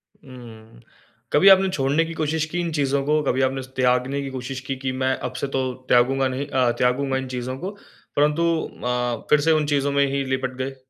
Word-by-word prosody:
हुँ। 115 -4 -14 0.5
कभी 170 +7 +5
आपने 190 0 +6
छोड़ने 145 -2 +1
की 165 - -6
कोशिश 160 0 -1
की, 175 - -2
इन 170 -1 -2
चीज़ों 140 -2 0
को, 150 +1 +2
कभी 130 -1 0
आपने 135 0 -4
त्यागने 125 +2 +1
की 140 - -5
कोशिश 130 0 -5
की 135 - -1
कि 130 0 -3
मैं 130 0 0
अब 125 - -9
से - - -1
तो 130 -1 -1 0.2
त्यागूँगा 130 +2 +3
नहीं 130 +2 -4
अ, 130 -4 +2
त्यागूँगा 130 +2 +1
इन 130 0 -4
चीज़ों 125 0 -4
को 185 +8 -5 0.4
परंतु 150 +3 +2 0.4
अ, 125 -1 -1
फ़िर 150 - +5
से 160 +2 +3
उन 155 -1 +2
चीज़ों 145 -1 +1
में 140 0 +3
ही 140 0 -1
लिपट 130 0 -2
गए? 135 +1 -4
135 Hz, 210 wpm, -23 LUFS, 130-145 Hz, 0.5 s, आपने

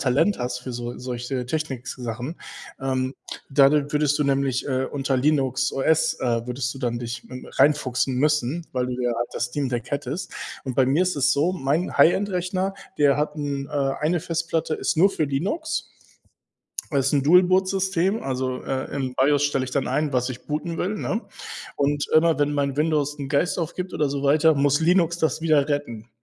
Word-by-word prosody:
Talent 140 +10 +2
hast 125 0 -2
für 125 0 -7
so 120 0 -5
solche 125 0 -4
Technik-Sachen. 130 -2 -4 0.5
Ähm, 130 0 -1 0.3
da 135 0 +6
da 145 0 +1
würdest 150 -1 +2
du 150 - +1
nämlich, 135 -2 0
äh, 130 -1 0
unter 135 -2 -1
Linux 135 -1 +1
OS 160 +4 +2
äh, 115 -2 0
würdest 125 +1 -3
du - - -9
dann 120 -1 -1
dich, 120 0 -5
hm, 130 0 -9
reinfuchsen 135 -2 +2
müssen, 150 +3 +1
weil 125 -1 0
du 125 0 -4
ja 120 -1 +1 0.2
das - - -1
Steam 135 +2 -2
Deck 120 +1 -4
hättest. 145 +5 -3 0.3
Und 130 -3 -4
bei 130 - +4
mir 145 +7 +2
ist 185 - 0
es 145 0 +2
so, 155 +6 +2
mein 155 +2 -1
High-End-Rechner, 185 +1 +2 0.2
der 145 -2 +4
hat 150 +1 -1
'n 140 -2 -3
äh, 140 -2 0
eine 170 +3 +2
Festplatte 165 -1 -2
ist - - -1
nur 195 +5 +5
für 155 - 0
Linux. 205 - -2 1.0
Das 135 -2 +1
ist 140 - 0
'n 140 - +3
Dual-Boot-System. 185 +3 +3
Also, 130 -1 -2
äh, 130 -1 -3
im 130 -2 -2
BIOS 145 +2 +3
stelle 140 -2 +1
ich 130 - -5
dann 135 0 0
ein, 145 +3 0
was 125 -1 +1
ich 125 -1 -8
booten 160 +3 -3
will, 200 +4 -1
ne? 225 - -2 0.5
Und 145 +1 0
immer 165 0 +4
wenn 145 0 +2
mein 140 -2 0
Windows 150 -2 +1
'n 135 - -5
Geist 160 +5 +1
aufgibt 180 +3 -4
oder 150 -2 +1
so 140 0 -3
weiter, 155 +2 +4
muss 140 0 +3
Linux 170 0 +3
das 160 - +1
wieder 155 -4 +3
retten. 120 -6 -3
140 Hz, 190 wpm, -24 LUFS, 130-160 Hz, 1.0 s, da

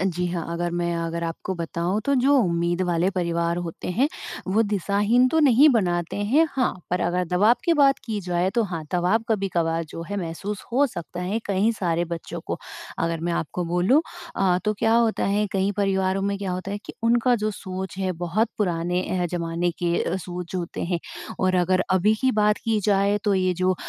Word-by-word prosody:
अ, - - 0
जी 180 -1 0
हाँ, 175 -2 -3
अगर 175 +1 -2
मैं 170 0 -1
अगर 170 0 -3
आपको 165 +3 -4
बताऊँ 170 +3 -2
तो 280 - +2
जो 280 +3 +4
उम्मीद 170 -2 0
वाले 175 0 +1
परिवार 170 -2 -1
होते 165 - -6
हैं, 250 +11 +2 0.4
वो 210 +4 +3
दिशाहीन 205 +4 +2
तो 320 - +1
नहीं 280 0 +6
बनाते 175 - +1
हैं। 240 +11 +3
हाँ, 260 -2 +1 0.2
पर 180 - 0
अगर 180 +1 0
दबाव 205 +6 +4
की 340 - +3
बात 275 -3 +4
की 220 -3 -3
जाए 180 0 0
तो 235 - +3
हाँ, 170 -5 -5
दवाब 180 +6 +2
कभी-कभार 170 -6 0
जो 165 - -7
है 205 - -2
महसूस 195 +3 -4
हो 280 +4 +4
सकता 175 - -7
है 195 +5 -1
कई 200 +3 +2
सारे 175 -5 0
बच्चों 170 -1 -6
को। - - -3 0.4
अगर 165 0 -1
मैं 170 +1 -1
आपको 170 +2 -2
बोलूँ 180 - +3 0.4
अ, 185 -2 +3
तो 215 0 +1
क्या 225 - +2
होता 230 -1 +2
है 205 +1 +1
कई 195 0 +1
परिवारों 195 -1 +1
में 200 0 0
क्या 195 -2 -3
होता 185 +2 -4
है 205 - -3
कि - - -7
उनका 240 +2 +3
जो 215 -1 -1
सोच 190 -2 -6
है, 190 -1 0
बहुत 175 +6 0
पुराने 180 -2 0 0.2
अ, - - +1
ज़माने 170 0 -1
के 170 +1 0
सोच 180 0 -7
होते 175 -2 -3
हैं 175 0 -1 0.4
और 185 0 +2
अगर 185 +1 +2
अभी 190 +3 +4
की 260 - +3
बात 210 0 +3
की 225 -2 +1
जाए 200 0 +3
तो 205 -2 +3
ये 185 -1 +2
जो 185 +1 +1
185 Hz, 205 wpm, -24 LUFS, 175-210 Hz, 0.4 s, नहीं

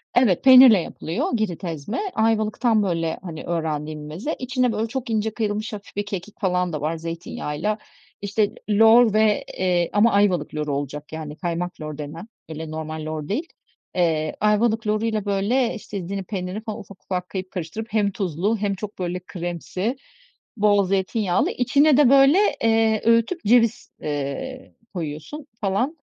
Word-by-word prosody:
Evet, 235 -8 +3
peynirle 255 -5 +9
yapılıyor 165 +4 -3
Girit 195 -5 -2
ezme. 165 - -4
Ayvalık'tan 220 0 +2
böyle 165 -4 -1
hani 165 -4 -7
öğrendiğim 155 -2 -3
bir - - -8
meze. 180 - -4
İçine 255 -1 0
böyle 220 +1 -1
çok 255 +1 -5
ince 220 -1 0
kıyılmış 215 -1 -2
hafif 200 -1 -9
bir 205 - -2
kekik 205 +1 -7
falan 180 -4 0
da 150 - -3
var 160 +2 -1
zeytinyağıyla. 165 +4 -3 0.4
İşte, 205 +1 0 0.2
lor 225 +1 +6
ve, 215 -1 +3
eee, 180 -2 +1
ama 220 +3 +4
Ayvalık 190 -7 +2
loru 150 -1 -2
olacak 145 +2 -5
yani 155 -1 -6
kaymak 175 0 -4
lor 155 -1 -6
denen, 155 +7 -7 0.2
öyle 160 0 -6
normal 155 0 -5
lor 155 -1 -4
değil. 295 - -2 0.5
Eee, 160 -3 +1
Ayvalık 220 +1 +2
loruyla 215 0 0
böyle, 210 +5 +1
işte 205 -1 -7
Ezine 195 +2 -4
peynirini 190 +2 -5
falan 215 -2 -5
ufak 200 -1 -13
ufak 180 -1 -3
karıp 185 -1 -5
karıştırıp 185 +5 -5
hem 205 -2 +2
tuzlu 190 +3 -1
hem 200 -1 -1
çok 205 +1 -8
böyle 180 0 -2
kremsi, 180 - -4 0.6
bol 205 -1 +4
zeytinyağlı, 190 0 0
içine 280 +3 +3
de 290 -4 +6
böyle, 275 +4 +6 0.3
eee, 225 -1 +3
öğütüp 230 +10 +3
ceviz, 230 +1 +3
eee, 150 - -4 0.2
koyuyorsun 175 - -6
falan. 240 +11 0
200 Hz, 155 wpm, -23 LUFS, 170-225 Hz, 0.6 s, peynirle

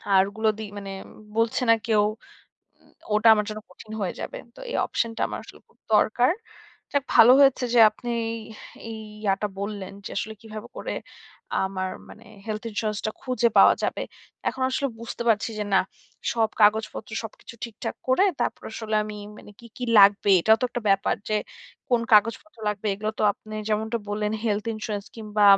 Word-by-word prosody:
আর 190 - +7
ওগুলো 220 +2 0
দি 220 - -4
মানে 195 -1 -6 0.4
বলছে 230 +2 +1
না 230 - +8
কেউ। 215 -2 +4 0.8
উম - - -26 0.2
ওটা 215 +2 +5
আমার 210 - 0
জন্য 215 0 -6
কঠিন 215 +4 -13
হয়ে 190 -3 -2
যাবে। - - -5 0.2
তো - - -12
এই - - -1
অপশন 230 - -1
টা - - -2
আমার - - -5
আসলে - - -14
খুব - - -31 0.2
দরকার। 240 +6 +4 0.6
যাক 285 -2 +1
ভালো 240 +3 +9
হয়েছে 270 -2 +5
যে - - +5
আপনি 240 +3 -7 0.8
এই 225 -1 -6 0.2
ইয়াটা 200 +1 +1
বললেন 200 -2 -5
যে, - - -5
আসলে 220 +1 -4
কিভাবে 215 -1 -8
করে - - -4 0.7
আমার 190 -1 -3 0.2
মানে 230 - -14 0.2
হেলথ 215 -1 -3
ইন্সুরেন্স 215 -1 -2
টা 215 - 0
খুঁজে 255 -2 +2
পাওয়া - - +8
যাবে। - - -1 0.5
এখন 260 - -4
আসলে 275 +1 0
বুঝতে 235 0 -5
পারছি 220 0 +2
যে 210 - -1
না, - - +6 0.5
সব 225 -2 +2
কাগজপত্র 215 +1 +2
সবকিছু 225 +1 -10
ঠিকঠাক 235 -2 -6
করে 260 +10 +4 0.2
তারপর - - -1
আসলে 220 -1 -4
আমি 210 0 -7 0.2
মানে - - -13
কী, 235 - -12
কী 250 - -2
লাগবে, 200 0 +6
এটাও 220 +5 +5
তো - - +1
একটা 245 - -4
ব্যাপার। 195 0 +2
যে 215 - +1 0.5
কোন 240 -2 +4
কাগজপত্র 230 +7 +3
লাগবে। 210 0 -3
এগুলো 215 +2 -2
তো - - +1
আপনি 215 +2 -12
যেমনটা 220 +2 0
বললেন। 210 0 -1
হেলথ 210 -2 0
ইন্সুরেন্স 215 -2 -4
কিংবা 210 -2 0
215 Hz, 180 wpm, -25 LUFS, 210-230 Hz, 0.8 s, ভালো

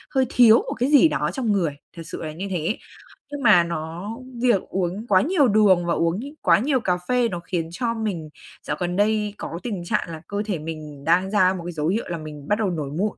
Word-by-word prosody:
hơi 265 -1 +4
thiếu 235 -3 +7
một - - -3
cái 250 +3 +1
gì 295 +2 +7
đó - - -1
trong 245 -6 -1
người, 170 -8 0 0.2
thật - - -6
sự 165 - -7
là 155 - -4
như 185 +5 -5
thế. 180 +3 -1 0.5
Nhưng 285 -1 -5
mà 210 -7 +6
nó 170 +3 -5 0.3
việc 235 -7 +4
uống 190 +4 -2
quá 185 -4 +5
nhiều 300 - +3
đường 200 -5 +4
và 170 - +1
uống 165 +3 0
nh - - -6 0.2
quá - - +4
nhiều 265 +3 +1
cà 180 -6 0
phê 245 -2 +2
nó 175 -4 -4
khiến 170 -1 -3
cho 230 +6 -2
mình 200 -9 -4 0.4
dạo 150 - -2
gần 175 0 -2
đây 210 +1 +1
có 165 - -6
tình 205 -8 -4
trạng 170 - -1
là 160 -1 -7
cơ 205 +1 -2
thể 195 -6 -2
mình 155 -2 -8
đang 180 +5 +2
ra 185 -3 +4
một 180 -3 -6
cái 175 - -4
dấu 155 -2 -2
hiệu 215 +6 0
là 170 - -3
mình 150 -2 -9
bắt 210 - +1
đầu 210 -3 +1
nổi 155 -5 -3
mụn. 205 +3 -1
185 Hz, 245 wpm, -23 LUFS, 165-220 Hz, 0.5 s, thiếu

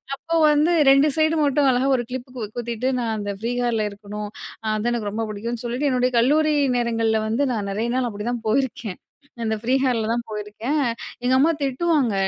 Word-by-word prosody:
அப்போ 330 +4 -4 0.2
வந்து 305 +4 +3 0.2
ரெண்டு 275 +2 +5
சைடு 315 +1 +3
மட்டும் 280 0 +3
அழகா 255 +2 +1
ஒரு 240 - -3
கிளிப்புக்கு 250 -4 -6
குத்திட்டு 240 +2 -2
நான் 225 -2 -1
அந்த 205 -1 -3
ஃப்ரீ 235 +2 -2
ஹேர்ல 225 -3 0
இருக்கணும், 210 +1 -7 0.5
அது 220 +3 0
எனக்கு 210 -4 -2
ரொம்ப 225 +1 -2
பிடிக்கும்னு 230 +3 -5
சொல்லிட்டு 255 +5 0
என்னோட 250 0 +2
கல்லுரி 300 +5 +3 0.2
நேரங்கள்ல 225 -2 +1
வந்து 265 +6 +1
நான் 205 -3 -3
நெறைய 225 +3 -1
நாள் 250 -2 0
அப்படிதான் 225 +3 -4
போயிருக்கேன். 230 -5 -1 0.4
அந்த 220 0 0
ஃப்ரீ 250 +3 0
ஹேர்ல 230 -4 +1
தான் 235 0 -1
போயிருக்கேன். 215 +7 -3 0.4
எங்க 255 +1 +2
அம்மா 315 +5 +4
திட்டுவாங்க. 275 -3 +1
240 Hz, 175 wpm, -23 LUFS, 220-270 Hz, 0.5 s, ரெண்டு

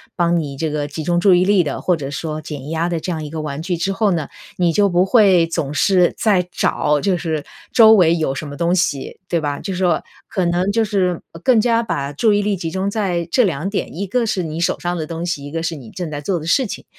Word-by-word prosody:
帮 170 -1 +2
你 140 -3 -5
这 160 +2 -1
个 145 -1 -2
集 155 +2 -6
中 175 +2 +1
注 185 0 +5
意 180 - +3
力 195 -2 +4
的， 145 - -4
或 180 - +2
者 140 -4 -5
说 155 +2 -4
减 150 -3 -7
压 165 +2 -1
的 170 -2 -1
这 180 - -4
样 160 -2 -3
一 150 - -6
个 160 +1 -5
玩 150 0 -5
具 180 0 -2
之 195 +4 -1
后 205 0 +1
呢， 160 -5 -1 0.3
你 175 -2 +2
就 205 +2 +3
不 180 0 +3
会 195 -5 +5
总 145 -3 -2
是 180 +3 +3
在 190 -5 +2
找， 150 -1 +1
就 190 +4 +1
是 160 -3 -3 0.3
周 220 -2 +7
围 170 -5 +5
有 155 -5 -1
什 145 +2 -5
么 145 - -8
东 170 +1 +1
西， 150 -7 -1
对 170 - +1
吧？ 145 -2 -3
就 195 - -5
是 - - -4
说， 175 -4 +2 0.3
可 185 -4 -1
能 175 +3 +1
就 225 +1 +2
是 190 -5 0 0.2
更 240 -4 +4
加 230 0 +2
把 140 -10 -3
注 210 +9 +2
意 205 - +2
力 205 0 0
集 165 -2 -4
中 190 +1 -1
在 185 -5 -1
这 255 - +4
2 175 -2 -1
点， 200 - -3
一 195 +4 -3
个 235 +5 0
是 210 -4 -1
你 160 -1 -4
手 170 - 0
上 175 0 -2
的 155 - -3
东 165 +1 -5
西， 170 -5 -3
一 145 - -8
个 165 +1 -3
是 165 0 -2
你 130 -7 -11
正 175 -4 -5
在 145 - -5
做 175 +3 -1
的 160 - -8
事 265 +8 +3
情， 205 - -6
175 Hz, 285 characters per minute, -19 LUFS, 155-195 Hz, 0.3 s, 周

